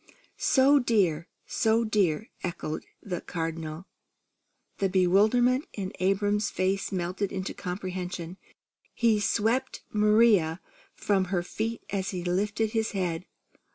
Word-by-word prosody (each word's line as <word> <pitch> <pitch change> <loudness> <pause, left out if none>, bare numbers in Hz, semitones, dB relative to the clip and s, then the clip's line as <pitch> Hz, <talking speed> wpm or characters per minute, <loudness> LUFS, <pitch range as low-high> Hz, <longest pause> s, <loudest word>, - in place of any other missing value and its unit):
"So 280 +2 +5
dear! 190 - +1 0.2
So 225 +1 +2
dear!" 210 -3 0
echoed 170 -3 -4 0.2
the 180 -4 -4
Cardinal. 165 0 -4 0.9
The 195 - +2
bewilderment 215 - +3
in 195 -2 -5
Abram's 205 +2 +1
face 190 +1 -1
melted 185 +2 -2
into 190 0 -4
comprehension. 180 -1 -5 0.6
He 225 -3 +3
swept 230 +5 0
Maria 210 -6 +4 0.4
from 195 -2 +1
her 180 -1 -1
feet 225 +5 -4
as 195 -1 -1
he 180 -2 -4
lifted 205 +4 0
his 220 -1 -1
head. 180 -3 -2
195 Hz, 115 wpm, -28 LUFS, 180-220 Hz, 0.9 s, So